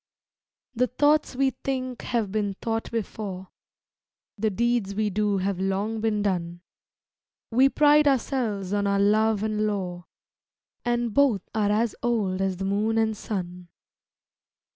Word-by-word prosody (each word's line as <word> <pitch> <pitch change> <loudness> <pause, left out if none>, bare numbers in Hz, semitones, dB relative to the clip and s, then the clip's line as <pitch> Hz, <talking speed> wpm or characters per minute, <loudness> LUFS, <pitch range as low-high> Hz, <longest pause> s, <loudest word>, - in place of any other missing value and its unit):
The 250 +1 +1
thoughts 290 +3 +2
we 270 +1 +2
think 255 -2 -4
have 225 -5 -1
been 205 -2 -1
thought 225 +2 -3
before; 200 -4 -5 0.9
The 220 +1 0
deeds 230 -1 0
we 210 0 0
do 205 0 +1
have 190 0 -1
long 200 +3 -1
been 215 -2 0
done; 175 -3 -2 0.9
We 260 +4 +5
pride 295 +1 +5
ourselves 230 -8 0
on 205 0 +1
our 200 0 +1
love 215 +1 +3
and 215 0 0
lore 180 -4 -3 0.8
And 240 -2 0
both 250 -9 +2
are 210 -2 +1
as 220 +2 +1
old 205 -6 0
as 190 -1 0
the 195 - -3
moon 210 +3 0
and 220 -1 +1
sun. 180 -4 -5
215 Hz, 140 wpm, -25 LUFS, 195-235 Hz, 0.9 s, We